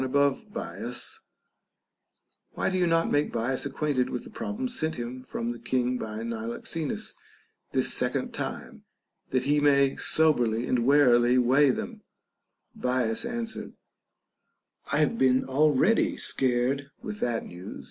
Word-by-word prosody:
above 140 - +1
Bias), - - -5 1.3
Why - - -1
do 185 - 0
you 175 - +3
not 165 0 +2
make 145 - +1
Bias 125 +4 -1
acquainted 140 -2 -1
with 125 - -4
the - - -12
problems 235 +4 -4
sent 160 0 -1
him 125 +1 -5
from 120 -2 -4
the 120 - -7
King 125 -1 0
by 110 0 -5
Niloxenus 115 +7 -4 0.6
this - - +2
second - - 0
time, - - -6 0.5
that 130 - +1
he 145 +1 +2
may 140 -2 +4
soberly 120 -8 +2
and 125 -1 0
warily 125 -3 +5
weigh 130 +3 +4
them 125 - -3 0.4
\ - - -47
Bias 125 - 0
answered, 235 -2 -4 1.2
I - - +2
have 230 - +1
been 130 0 +3
already 150 +9 +3
scared 130 +2 +1
with 210 -1 -6
that 120 -2 -1
news. 90 +1 -9
130 Hz, 135 wpm, -27 LUFS, 120-150 Hz, 1.3 s, warily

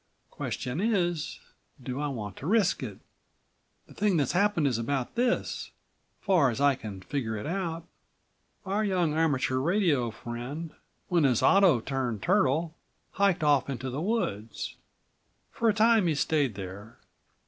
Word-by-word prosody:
Question 125 +5 -4
is, 175 -8 0 0.4
do 130 +1 -5
I 150 - -1
want 105 -8 -5
to 145 - -6
risk 205 -1 +2
it? - - -6 0.9
The - - -16
thing 200 -4 +1
that's 140 -4 +1
happened 200 -3 +2
is 125 -5 +1
about 130 +2 -2
this, 245 +1 -1 0.5
far 180 -9 +3
as 120 - -3
I 140 0 +5
can 105 -6 -8
figure 110 0 -3
it 105 - -6
out: 170 -1 -3 0.8
Our 200 +3 0
young 180 -6 +1
amateur 145 -5 +1
radio 160 - +2
friend, 120 +8 -6 0.4
when 170 -3 +3
his 125 -5 +3
auto 185 - +5
turned 125 -5 -3
turtle, 165 -4 +2 0.4
hiked 195 -4 +2
off 145 -3 +3
into 130 -1 -4
the 140 +4 -3
woods. 140 - -2 0.8
For 230 - +1
a - - +3
time 220 -3 +4
he 160 - +1
stayed 145 -5 +1
there. 100 +5 -8
150 Hz, 150 wpm, -28 LUFS, 125-185 Hz, 0.9 s, I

